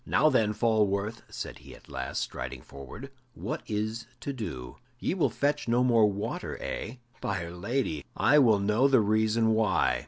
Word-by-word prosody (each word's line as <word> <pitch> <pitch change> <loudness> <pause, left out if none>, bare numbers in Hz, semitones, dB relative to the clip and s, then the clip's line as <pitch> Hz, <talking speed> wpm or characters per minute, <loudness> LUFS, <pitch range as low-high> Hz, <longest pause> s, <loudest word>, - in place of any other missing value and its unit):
"Now, 155 +4 +4
then, 110 -6 +2
Falworth," 110 -1 +1
said - - -6
he - - -12
at - - -18
last, 65 - -3
striding 65 0 -6
forward, 70 - -10 0.2
"what - - -4
is 110 +2 -2
to 140 - -3
do? 65 - -6 0.2
Ye - - -1
will 185 - +2
fetch 145 -2 0
no 120 +2 +3
more 115 -4 +5
water, 105 +2 -3
eh? 115 - -4 0.3
By 95 -4 -2
'r 85 - -7
Lady, 90 - -2
I 150 +2 +5
will 115 -6 +6
know 105 +6 +3
the 135 -3 +5
reason 110 +1 +2
why." 105 - +2
110 Hz, 175 wpm, -29 LUFS, 100-120 Hz, 0.3 s, will